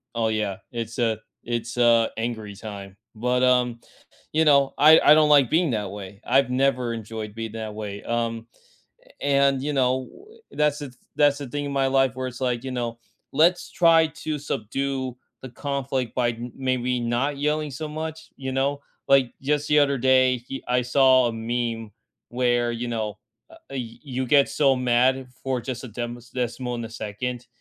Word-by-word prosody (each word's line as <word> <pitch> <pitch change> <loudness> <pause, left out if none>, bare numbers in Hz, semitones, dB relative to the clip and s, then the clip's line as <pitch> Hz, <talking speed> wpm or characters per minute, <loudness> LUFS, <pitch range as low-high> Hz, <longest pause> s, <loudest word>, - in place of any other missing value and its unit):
oh, 115 -1 +1
yeah, 105 -3 -1 0.2
it's, 115 0 -5
uh, 115 -2 +1 0.3
it's, 120 +1 -3
uh, 115 -2 +5
angry 110 -3 -4
time. 100 -2 -9 0.2
But, 125 +3 0
um, 125 -2 +2 0.5
you 160 +1 +3
know, 140 -2 +4
I 155 +3 +8
I - - +7
don't 155 -1 +4
like 140 -5 +6
being 165 -2 +2
that 105 -4 -2
way. 100 0 -9
I've 135 +1 +3
never 125 -2 +1
enjoyed 110 -1 -6
being 115 -1 -5
that 110 -1 -5
way. 105 -1 -6
Um, 115 -1 -2 0.8
and, 140 -1 +2
you 150 +1 -1
know, 130 -1 +1 0.4
that's 150 -1 +1
the 145 - -5
th 125 - -22 0.2
that's 145 -1 +4
the 140 - -6
thing 145 +3 -3
in 140 - -4
my 135 -1 +1
life 135 -1 +3
where 130 0 -4
it's 120 0 -10
like, 125 -1 -1
you 130 - -4
know, 120 -2 -3 0.3
let's 170 +5 +3
try 165 -2 +5 0.2
to 155 -1 -1
subdue 135 0 -3 0.3
the 130 - -7
conflict 135 -2 -3
by 120 -2 +2
m 120 +1 -7
maybe 125 -1 0
not 120 +5 -1
yelling 150 +1 0
so 155 +4 -5
much, 160 +1 -6
you 135 -1 -5
know? 140 +2 0 0.3
Like, 135 -3 +4
just 145 +1 0
the 150 - +4
other 140 -2 +3
day, 130 -1 +3
y 135 - -4
I 125 0 +2
saw 130 0 +4
a - - -3
meme 115 -1 -3 0.4
where, 120 -1 +1
you 120 +1 -4
know, 110 -3 -3 0.3
uh, - - -14
y 125 -4 -6 0.2
you 130 0 0
get 140 +1 +4
so 140 -3 +3
mad 125 +1 +2
for 130 -2 -1
just 125 +1 -5
a - - -7
dems 120 +2 -6
decimal 125 0 -3
in 120 - -5
a 115 - -8
second, 120 +3 -5
125 Hz, 185 wpm, -24 LUFS, 115-140 Hz, 0.8 s, I